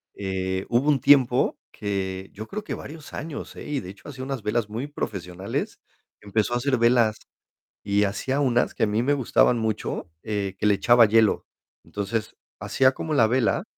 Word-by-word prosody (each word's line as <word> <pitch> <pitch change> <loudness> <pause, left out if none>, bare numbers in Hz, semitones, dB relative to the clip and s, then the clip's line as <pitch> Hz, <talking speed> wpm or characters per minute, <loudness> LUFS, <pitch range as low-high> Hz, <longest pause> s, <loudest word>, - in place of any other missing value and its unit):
eh, 95 -1 -2
hubo 125 +5 +2
un 140 -4 +3
tiempo, 130 -3 +4
que 95 -2 -3
yo 110 +2 -8
creo, 215 +1 -5
que - - -4
varios 155 0 -10
años, 155 -1 -6
¿eh? - - -8
Y 145 -2 -1
de 90 - -9
hecho, 100 - -13
hacía 130 -2 -7
unas 135 -2 -4
velas 105 0 0
muy 115 +7 -4
profesionales. 95 -9 -4 0.4
Empezó 105 +3 -1
a - - +2
hacer 130 +1 +1
velas. 115 -2 +3 0.7
Y 100 0 +2
hacía 130 +8 -1
unas, 120 -3 +2
que - - -4
a - - +2
mí 105 +2 +1
me 140 +4 +2
gustaban 125 -2 +3
mucho, 110 -5 -3
eh, 100 -3 -2
que - - 0
le 105 - +5
echaba 120 +2 +5
hielo. 110 0 +3 0.4
Entonces, 105 +2 -4 0.2
hacía 130 0 +3
como 155 +3 -3
la 115 - +5
vela, 125 0 +1
115 Hz, 185 wpm, -25 LUFS, 100-130 Hz, 0.7 s, le